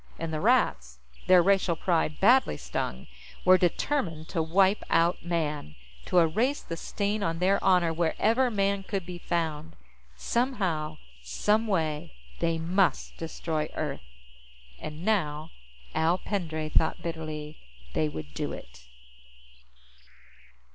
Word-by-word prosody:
And 165 Hz, -1 st, -4 dB
the 155 Hz, -, -2 dB
Rats, 65 Hz, -, +2 dB, 0.3 s
their 180 Hz, -2 st, +7 dB
racial 190 Hz, -3 st, +3 dB
pride 160 Hz, -2 st, 0 dB
badly 235 Hz, -, +4 dB
stung, 65 Hz, 0 st, -4 dB, 0.4 s
were 185 Hz, 0 st, +7 dB
determined 175 Hz, -, -1 dB
to 170 Hz, -, 0 dB
wipe 190 Hz, +5 st, +3 dB
out 170 Hz, +2 st, +2 dB
Man, 150 Hz, -, -2 dB, 0.3 s
to -, -, 0 dB
erase 220 Hz, -, +2 dB
the 165 Hz, -, -5 dB
stain 205 Hz, +5 st, -2 dB
on 165 Hz, -3 st, -1 dB
their 190 Hz, +3 st, +2 dB
honor 180 Hz, -3 st, +4 dB
wherever 220 Hz, +10 st, +2 dB
Man 200 Hz, -2 st, 0 dB
could 195 Hz, -2 st, -4 dB
be 180 Hz, -1 st, -7 dB
found. 160 Hz, -2 st, -2 dB, 0.4 s
Somehow, 170 Hz, -, -1 dB, 0.2 s
some 210 Hz, -, +1 dB
way, 155 Hz, -, -1 dB, 0.2 s
they 165 Hz, -1 st, +1 dB
must 180 Hz, +3 st, +1 dB
destroy 160 Hz, -1 st, -3 dB
Earth. 150 Hz, -3 st, -3 dB, 0.8 s
And 155 Hz, +3 st, -7 dB
now, 155 Hz, -7 st, 0 dB, 0.4 s
Al 165 Hz, +3 st, +2 dB
Pendray 160 Hz, -6 st, -3 dB
thought 160 Hz, -, +1 dB
bitterly, 155 Hz, -2 st, -5 dB, 0.3 s
they 80 Hz, -1 st, +1 dB
would 75 Hz, -1 st, -8 dB
do -, -, -3 dB
it. -, -, -12 dB
165 Hz, 125 wpm, -28 LUFS, 155-195 Hz, 0.8 s, their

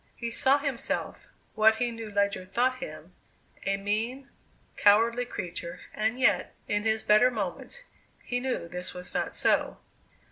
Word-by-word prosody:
He 235 Hz, -1 st, -4 dB
saw 270 Hz, +3 st, +4 dB
himself 280 Hz, -4 st, -3 dB, 0.3 s
what 220 Hz, +1 st, +5 dB
he 240 Hz, +1 st, -1 dB
knew 225 Hz, -1 st, -7 dB
Ledyard 200 Hz, -2 st, -1 dB
thought 255 Hz, +2 st, +2 dB
him 265 Hz, -, -8 dB, 0.5 s
a 195 Hz, 0 st, +2 dB
mean, 225 Hz, +7 st, -2 dB, 0.5 s
cowardly 230 Hz, +4 st, +4 dB
creature, 170 Hz, -5 st, -5 dB
and 220 Hz, +4 st, -1 dB
yet, 260 Hz, -, +2 dB
in 205 Hz, 0 st, +1 dB
his 220 Hz, 0 st, +1 dB
better 215 Hz, +4 st, +5 dB
moments, 220 Hz, -, -3 dB, 0.4 s
he 245 Hz, -, -2 dB
knew 255 Hz, -8 st, -2 dB
this 180 Hz, +2 st, -4 dB
was 180 Hz, 0 st, -4 dB
not -, -, -1 dB
so. -, -, +2 dB
220 Hz, 145 wpm, -28 LUFS, 200-245 Hz, 0.5 s, what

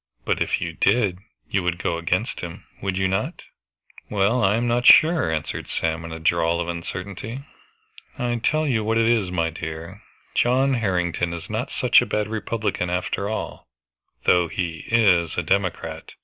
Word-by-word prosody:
But -, -, 0 dB
if -, -, +1 dB
you 85 Hz, -, -4 dB
did, 100 Hz, 0 st, +2 dB, 0.3 s
you 100 Hz, -, +2 dB
would 90 Hz, -1 st, -1 dB
go 85 Hz, -2 st, -2 dB
against 85 Hz, -, -1 dB
him, -, -, -8 dB, 0.2 s
would 95 Hz, -1 st, -2 dB
not 95 Hz, 0 st, -1 dB
you?" 60 Hz, -, -15 dB
"Well, 110 Hz, +5 st, +3 dB
I 95 Hz, +2 st, +4 dB
am 120 Hz, +1 st, 0 dB
not 120 Hz, +1 st, +1 dB
sure," 160 Hz, -, +7 dB
answered 80 Hz, -2 st, -3 dB
Sam 80 Hz, 0 st, -2 dB
in 80 Hz, -, -7 dB
a 80 Hz, -, -5 dB
drawl 85 Hz, +1 st, +1 dB
of 85 Hz, -, -2 dB
uncertainty. 90 Hz, +8 st, -5 dB, 0.8 s
"I 120 Hz, -2 st, -1 dB
tell 155 Hz, +7 st, +1 dB
you 115 Hz, -5 st, +1 dB
what 110 Hz, +1 st, +1 dB
it 115 Hz, -, +3 dB
is, 115 Hz, -5 st, +2 dB
my 85 Hz, -2 st, 0 dB
dear, 80 Hz, +4 st, -7 dB, 0.3 s
John 130 Hz, +3 st, +3 dB
Harrington 90 Hz, -6 st, 0 dB
is 85 Hz, -, -7 dB
not -, -, -2 dB
such -, -, +4 dB
a -, -, -3 dB
bad 105 Hz, 0 st, -1 dB
Republican 110 Hz, -4 st, -2 dB
after 90 Hz, +3 st, -2 dB
all, 110 Hz, -, -5 dB, 0.6 s
though 90 Hz, -1 st, +4 dB
he 85 Hz, -1 st, -4 dB
is 90 Hz, -8 st, +3 dB
a -, -, 0 dB
Democrat. 95 Hz, -2 st, -2 dB
95 Hz, 175 wpm, -23 LUFS, 85-115 Hz, 0.8 s, sure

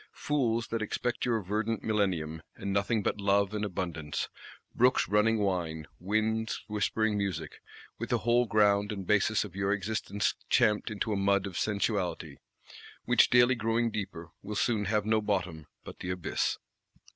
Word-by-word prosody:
Fools, 120 Hz, -6 st, 0 dB
that 115 Hz, -1 st, -2 dB
expect 120 Hz, +2 st, -2 dB
your 115 Hz, -4 st, 0 dB
verdant 110 Hz, +4 st, -2 dB
Millennium, 90 Hz, -7 st, 0 dB
and 100 Hz, -, -4 dB
nothing 100 Hz, +2 st, +1 dB
but 105 Hz, -, -1 dB
Love 100 Hz, 0 st, +2 dB
and 105 Hz, 0 st, -2 dB
Abundance, 85 Hz, -6 st, -3 dB, 0.4 s
brooks 125 Hz, +2 st, +3 dB
running 105 Hz, +3 st, +3 dB
wine, 85 Hz, -6 st, -1 dB
winds 110 Hz, +3 st, -1 dB
whispering 105 Hz, +1 st, 0 dB
music,—with 85 Hz, -6 st, -6 dB
the -, -, +2 dB
whole 120 Hz, +1 st, +2 dB
ground 105 Hz, -1 st, +3 dB
and 100 Hz, -3 st, -5 dB
basis 105 Hz, +2 st, +2 dB
of 100 Hz, -4 st, -10 dB
your 100 Hz, 0 st, 0 dB
existence 105 Hz, 0 st, -1 dB, 0.2 s
champed 105 Hz, -1 st, +3 dB
into 110 Hz, 0 st, -2 dB
a -, -, 0 dB
mud 100 Hz, 0 st, +2 dB
of 95 Hz, -2 st, -6 dB
Sensuality; 100 Hz, -3 st, -1 dB, 0.7 s
which, -, -, +5 dB
daily 125 Hz, +1 st, +5 dB
growing 115 Hz, 0 st, 0 dB
deeper, 95 Hz, -6 st, -5 dB
will 105 Hz, -, -6 dB
soon 105 Hz, -1 st, +1 dB
have 105 Hz, +1 st, +1 dB
no 110 Hz, 0 st, +2 dB
bottom 90 Hz, -7 st, -2 dB, 0.2 s
but -, -, -10 dB
the 90 Hz, -, -5 dB
Abyss! 90 Hz, -2 st, -1 dB
105 Hz, 155 wpm, -30 LUFS, 95-110 Hz, 0.7 s, which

